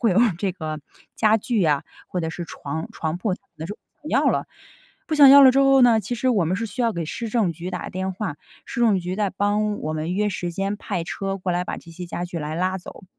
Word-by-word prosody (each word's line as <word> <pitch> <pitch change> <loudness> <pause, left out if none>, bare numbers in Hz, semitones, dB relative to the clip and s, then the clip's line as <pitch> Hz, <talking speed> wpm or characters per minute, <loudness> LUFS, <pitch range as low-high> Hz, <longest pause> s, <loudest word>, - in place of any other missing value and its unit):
会 230 - +3
有 185 - +3 0.2
这 195 - +1
个 155 -4 -5 0.3
家 220 0 +4
具 225 -1 0
啊， 150 -3 +2 0.2
或 180 - -2
者 160 -1 -2
是 175 - -5
床 160 0 -6
床 160 +1 -3
铺 185 +3 -1
他 - - -17
可 - - -44
能 160 - -5
就 205 +4 -6 0.3
不 305 - -7
要 - - +2
了。 - - 0 0.6
不 315 - -1
想 285 -3 +9
要 280 0 +10
了 260 -2 +8
之 275 - +4
后 270 -1 +5
呢， 235 -3 +6
其 215 +4 -4
实 255 +2 0
我 210 -8 +3
们 180 +4 0
是 230 - -2
需 250 +3 -4
要 230 -1 +2
给 170 -4 -3
市 225 +8 -5
政 210 -7 +1
局 175 +3 -6
打 180 -2 -5
电 190 +1 -3
话， 185 -6 -4 0.3
市 240 - -5
政 220 -5 +4
局 180 +1 -4
再 200 -1 0
帮 205 +1 0
我 155 - -3
们 155 +3 -2
约 210 +2 +1
时 175 -3 -3
间 195 +4 -2
派 195 -5 -3
车 195 +3 -3
过 185 -2 -2
来 175 +1 0
把 - - -4
这 165 - -12
些 180 +2 -7
家 175 0 -4
具 175 0 -7
来 155 +2 -4
拉 185 +1 0
走。 190 +2 -11
190 Hz, 285 characters per minute, -23 LUFS, 175-220 Hz, 0.6 s, 要